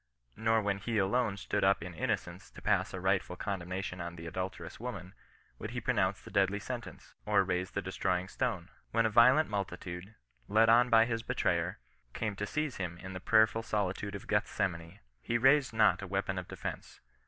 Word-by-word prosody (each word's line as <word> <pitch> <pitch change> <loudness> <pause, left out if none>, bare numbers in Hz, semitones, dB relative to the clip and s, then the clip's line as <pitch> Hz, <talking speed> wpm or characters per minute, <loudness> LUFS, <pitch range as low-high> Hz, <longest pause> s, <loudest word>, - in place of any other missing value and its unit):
Nor 110 0 +2
when 100 -1 0
he 115 +3 -2
alone 105 +1 +1
stood - - -1
up 95 -2 +3
in 90 0 -7
innocence - - -3
to - - -13
pass - - +2
a 95 - -5
rightful 95 -1 0
condemnation 90 -1 -4
on 85 0 -5
the 85 0 -9
adulterous 90 -1 -5
woman, 100 -6 -6 0.5
would - - -5
he - - -3
pronounce - - +1
the - - -13
deadly 100 +1 +2
sen 120 +4 -4
tence, - - -13
or - - +3
raise 90 0 -1
the - - -3
destroying 90 0 -1
stone. 100 -6 -2 0.2
When 115 0 +2
a 110 - +1
violent 130 +8 +6
multitude, 95 0 -5 0.3
led 110 +2 +4
on 120 +2 +6
by 115 -1 +6
his 115 -1 -2
betrayer, 90 -8 0 0.4
came 110 -2 -2
to 105 - -3
seize 150 +4 -2
him 85 -3 -4
in 95 +2 -8
the 95 - -5
prayerful 110 +3 +4
solitude 100 -2 -2
of 100 - -7
Gethsemane, 85 0 -1 0.2
he 120 - 0
raised 135 +3 +4
not 110 -3 +4
a 100 - -6
weapon 95 0 -1
of 90 - -8
defence. - - -7
100 Hz, 190 wpm, -32 LUFS, 90-115 Hz, 0.5 s, violent